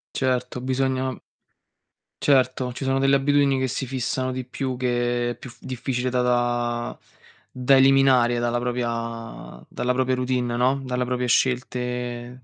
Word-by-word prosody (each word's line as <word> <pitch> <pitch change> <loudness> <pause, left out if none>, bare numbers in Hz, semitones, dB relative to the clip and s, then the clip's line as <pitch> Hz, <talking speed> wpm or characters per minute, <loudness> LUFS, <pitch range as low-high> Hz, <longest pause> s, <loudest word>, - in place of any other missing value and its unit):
Certo, 125 -1 -1
bisogna 130 0 -1 1.1
Certo, 130 -2 +2
ci 135 +2 -6
sono 135 0 +1
delle 135 0 +4
abitudini 140 -1 +2
che 130 - 0
si 130 +2 -3
fissano 130 0 -2
di 130 -1 -4
più, 130 0 -4
che 120 -1 0
è - - -6
più 130 - -10
f - - -16
difficile 130 -1 -3
da 125 0 +1
da 120 -1 0 0.5
da 130 +2 +3
eliminare 130 -3 +5
dalla 120 0 0
propria 115 -2 -4
dalla 125 - -2
propria 130 0 +1
routine, 125 -1 -1
no, 130 +3 +2
dalla 125 0 -1
propria 125 0 -1
scelte 125 0 -1
125 Hz, 145 wpm, -24 LUFS, 120-130 Hz, 1.1 s, eliminare